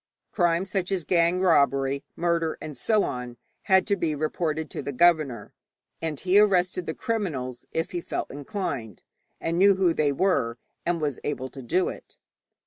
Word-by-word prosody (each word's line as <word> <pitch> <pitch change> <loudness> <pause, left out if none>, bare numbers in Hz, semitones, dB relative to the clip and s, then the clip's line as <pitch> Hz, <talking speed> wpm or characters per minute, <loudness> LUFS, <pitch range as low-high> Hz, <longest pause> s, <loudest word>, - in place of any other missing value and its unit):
Crime 175 -1 +2
such 190 -1 -2
as 190 -3 0
gang 170 +2 +2
robbery, 140 -5 +3
murder, 170 -2 0
and 150 -2 -7
so 215 +5 +2
on, 125 -1 -5 0.3
had 190 0 +5
to 200 - +1
be 165 -5 -1
reported 155 +1 -2
to - - -4
the 140 - -4
governor, 140 -6 +2 0.5
and 155 -4 -3
he 190 +2 +4
arrested 185 -3 +2
the 160 - -3
criminals 135 - -3
if 165 - -2
he 175 - -3
felt - - -4
inclined, 140 - -5 0.4
and 165 +1 -1
knew 200 +1 +6
who 185 -3 +3
they 150 -3 +2
were, 135 -7 +1 0.3
and 170 -2 0
was 145 -4 -2
able 130 -3 -3
to 135 - -10
do 175 +9 +1
it. - - -8
165 Hz, 170 wpm, -26 LUFS, 140-185 Hz, 0.5 s, knew